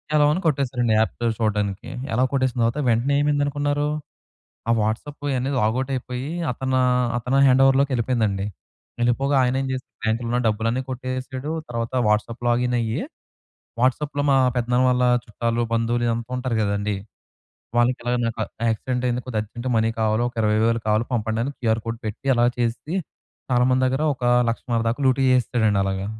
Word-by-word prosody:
Allow 145 -1 +5
అని 185 - -2
కొట్టేశారండి 125 -5 +1
app 110 - +1
పేరు 115 -1 +1
చూడడానికి. 105 -2 -1 0.2
ఎ‌లవ్ 125 +3 +3
కొట్టేసిన 130 -2 0
తర్వాత 115 +6 0
వెంటనే 120 +5 +2
ఏమైంది 145 -1 +2
అనుకున్నారు, 145 0 0 0.8
ఆ - - +5
వాట్సాపు 130 +7 -3
అనేది 135 +2 -1
లాగౌట్ 125 +5 0
అయిపోయి 125 +2 -5 0.2
అతనూ 130 +1 -1 0.4
అతను 125 +3 0
హ్యాండోవర్ 135 +1 +5
లోకేళ్ళిపోయిందండి. 115 -7 0 0.6
వెళ్ళిపోగా 135 +4 +2
ఆయన 125 +1 +1
ఏం 135 - -3
చేస్తాడు 130 0 -8
బ్యాంక్లో 115 +2 0
ఉన్న 125 - +1
డబ్బులన్నీ 115 +4 0
కొట్టేసాడు. 130 +3 -4 0.2
తర్వాత 115 +1 -3 0.2
వాట్సాప్ 110 +3 0
లాగిన్ 125 +1 +1
అయ్యి, 115 -1 -1 0.8
వాట్సాప్లో 145 +3 +1
మా 135 - +4 0.2
పెద్దనాన్న 125 +1 +2
వాళ్ళ 125 0 +1 0.2
చుట్టాలు, 115 +1 -1
బంధువులు 120 +1 +1
ఇదంతా 115 +1 -2
ఉంటారు 125 -2 -2
కదండీ, 100 0 -1 0.8
వాళ్ళకి 120 +2 +3
ఎలాగ 120 0 0
"నాకు 115 -1 -3 0.3
యాక్సిడెంటైంది. 125 +2 -1
కొద్దిగా 115 -4 -2
అర్జెంట్‌గా 120 +4 -5
మనీ 110 0 +2
కావాలో 110 +1 +1
ఒక - - -21
20,000 110 +2 +2
కావాలో 110 +2 +2
పంపండి 110 -1 -1
అని 140 - -2
క్యూఆర్ 115 -2 +1
కోడ్ 115 0 -3
పెట్టి" 110 +5 -5
అలా 120 0 +4
చేసి, 120 +7 -2 0.6
చాలా 125 0 +4
మంది 130 0 +2
దగ్గర 130 +3 -1
ఒక 125 - -11 0.3
1,50,000 115 0 -1
దాకా 120 +5 -3
లూటీ 130 +1 +3
చేసేసాడండి 115 -5 +2
అలాగా. 95 0 -2
120 Hz, 160 wpm, -23 LUFS, 115-130 Hz, 0.8 s, ఎ‌లవ్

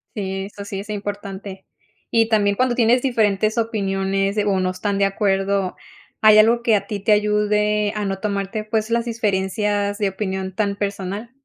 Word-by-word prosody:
Sí, 195 -2 -3
eso 200 0 -9
sí 200 -1 -5
es 205 +2 -9
importante. 200 -2 -6 0.4
Y 225 -1 +2
también 205 -2 +2
cuando 255 +2 +1
tienes 240 +1 +3
diferentes 215 -4 +1
opiniones 195 -2 -1
o 195 -2 +1
no 185 - 0
están 200 +1 -2
de 200 - +3
acuerdo, 195 -1 0 0.5
¿hay 215 -1 +7
algo 235 +2 +4
que 230 -2 +4
a 200 -1 -1
ti 205 -2 -4
te 205 +2 0
ayude 210 0 +2
a 210 - -2
no 195 -1 -3
tomarte, 200 +1 -2
pues, 215 0 -1
las 235 0 +1
diferencias 205 -2 -1
de 205 -3 0
opinión 190 -1 -4
tan 200 0 0
personal? 200 +2 -4
205 Hz, 175 wpm, -21 LUFS, 195-215 Hz, 0.5 s, hay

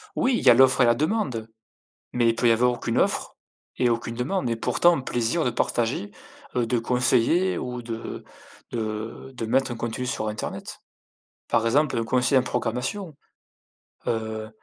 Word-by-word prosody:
Oui, 255 -1 +2
il - - -6
y - - +9
a - - +10
l'offre 130 +1 +5
et - - +6
la 120 0 +4
demande. 140 - -1 0.6
Mais 120 -1 +2
il 115 - +1
peut 120 +1 +2
y - - +6
avoir 125 +2 +3
aucune 120 - -3
offre - - 0 0.4
et 125 -1 +3
aucune 115 0 -2
demande 125 +2 -1
et 115 - 0
pourtant 175 +9 +3
un 135 - -3
plaisir 120 +6 0
de - - +3
partager, 115 -3 -1 0.4
heu, 120 -2 +2
de 125 - +1
conseiller 125 +9 +2
ou 125 -1 -4
de 115 -1 -6 0.5
de 110 +3 -5
de 115 -2 -4
mettre 130 +1 +1
un - - -4
contenu 120 +2 -4
sur 110 -3 -2
internet. 105 - -5 0.7
Par 115 -1 +2
exemple, 145 +4 +2
un 115 - 0
conseiller 125 +3 +3
en - - +2
programmation, 125 - -3 0.9
heu, 110 -1 -2
120 Hz, 175 wpm, -25 LUFS, 115-130 Hz, 0.9 s, a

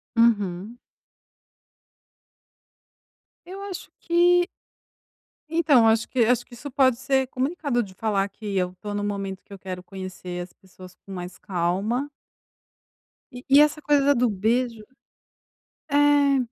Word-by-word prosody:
Uhum. 210 -1 +1 2.7
Eu 380 +2 -8
acho 390 -3 -7
que 350 +1 +3 1.0
então 300 -8 +4
acho 220 0 +3
que 255 - -3
acho 245 +1 +2
que - - -18
isso 270 +4 -8
pode 260 -3 +3
ser 265 0 +1
comunicado 265 -2 -1
de 190 -2 -12
falar 200 -1 0
que 205 -3 -5
eu 180 -1 0
estou 205 +3 -7
no 205 0 -2
momento 195 -2 -4
que 200 - -14
eu 195 - -10
quero 185 -1 -7
conhecer 185 -2 -7
as 175 - -9
pessoas 185 -1 -15
com 195 - -16
mais 180 -2 -7
calma 200 +9 -1 1.2
e 250 +1 -10
e 280 +2 +7
essa 300 0 +2
coisa 290 -2 +3
da 285 - +5
do 245 -2 +2
beijo, 225 +3 0 1.1
eh, 285 -1 +4
230 Hz, 135 wpm, -24 LUFS, 190-275 Hz, 2.7 s, e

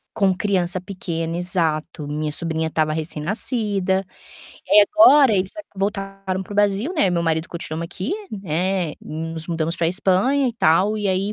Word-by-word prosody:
Com 195 -3 +3
criança 185 -2 0
pequena, 170 -3 -4
exato. 165 -4 -1
Minha 150 +1 -3
sobrinha 160 0 0
estava 155 -1 0
recém-nascida. 190 - -1 0.6
E 210 - +8
agora 295 - +6
eles 190 +7 -1
a 315 - -6
voltaram 195 -1 -3
para 205 - -10
o - - -6
Brasil, 205 - +1
né. 300 - +2
Eu - - +4
e - - +1
meu 170 -1 0
marido 160 0 -1
continuamos 165 -1 -4
aqui, 185 - -4 0.2
né, 185 -3 -2
nos 160 +1 -6
mudamos 165 -1 -2
pra 165 -1 +1
Espanha 200 +9 +2
e - - -4
tal, 205 +1 +2
e 205 -2 -1
aí 195 +3 0
185 Hz, 170 wpm, -21 LUFS, 165-200 Hz, 0.6 s, E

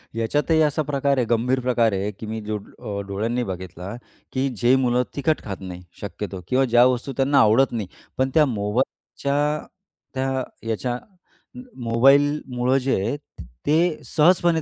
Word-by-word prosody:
याच्यातही 145 +8 +1
असा 150 +1 +2
प्रकार 140 -1 0
आहे 125 - +2
गंभीर 120 +3 +2
प्रकार 120 -3 +2
आहे, 100 +2 -1
की 105 - -10
मी 110 +1 -4
जो 105 0 -3
अ, 100 0 -7
डोळ्यांनी 115 +5 -1
बघितला, 95 -2 -6 0.4
की 130 +1 +1
जे 120 +3 +4
मुलं 125 -1 +2
तिखट 150 +2 0
खात 100 -2 -5
नाही 90 -1 -8 0.2
शक्यतो 100 -1 -5
किंवा 130 +1 +3
ज्या 120 0 +5
वस्तू 130 +2 0
त्यांना 140 +1 +3
आवडत 120 +3 +5
नाही, 110 -6 -3 0.3
पण 130 0 +2
त्या 155 -2 +5
मोबाईलच्या 125 +4 -2 0.8
त्या 130 0 -1 0.3
याच्या 120 +2 -1 0.9
मोबाईलमुळं 130 +1 +3
जे 135 0 +1
आहे, 145 - -1 0.5
ते 160 +2 +2
सहजपणे 170 0 +3
125 Hz, 150 wpm, -23 LUFS, 110-140 Hz, 0.9 s, ज्या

